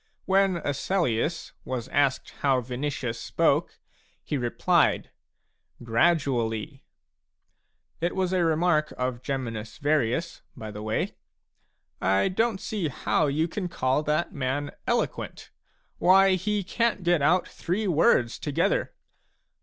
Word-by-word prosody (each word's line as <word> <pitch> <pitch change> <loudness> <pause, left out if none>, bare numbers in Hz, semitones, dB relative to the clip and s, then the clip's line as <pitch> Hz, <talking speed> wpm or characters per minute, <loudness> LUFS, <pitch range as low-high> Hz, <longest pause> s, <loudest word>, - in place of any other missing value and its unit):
When 195 -1 +3
Asellius 150 0 -1
was 125 -3 -4
asked 140 -2 +1
how 135 -2 +3
Vinicius 125 -1 -3
spoke, - - +1 0.5
he - - -3
replied: 120 -3 +1 0.4
" - - -21
Gradually 125 -1 0 0.5
"! - - -46
(It 170 +1 -1
was 185 -1 0
a 180 -2 +2
remark 160 -1 +2
of 125 -1 -2
Geminus 115 -5 -4
Varius, 150 +2 0 0.2
by 110 -1 -7
the 105 0 -7
way: 110 0 -1 0.5
" - - -46 0.2
I 100 - +2
don't 225 +1 0
see 200 -6 -2
how 150 +2 0
you 155 +4 +1
can 185 +2 -4
call 130 -3 +1
that 155 +3 -1
man 140 +1 -2
6 - - -27
eloquent - - -2 0.2
'; - - -43
why, 190 +1 +6
he 205 +2 0
can't 230 +1 0
get 175 -2 +3
out 175 +5 +3
three 190 +6 -3
words 145 -8 +3
together.") 145 -2 0
150 Hz, 130 wpm, -26 LUFS, 125-175 Hz, 0.5 s, why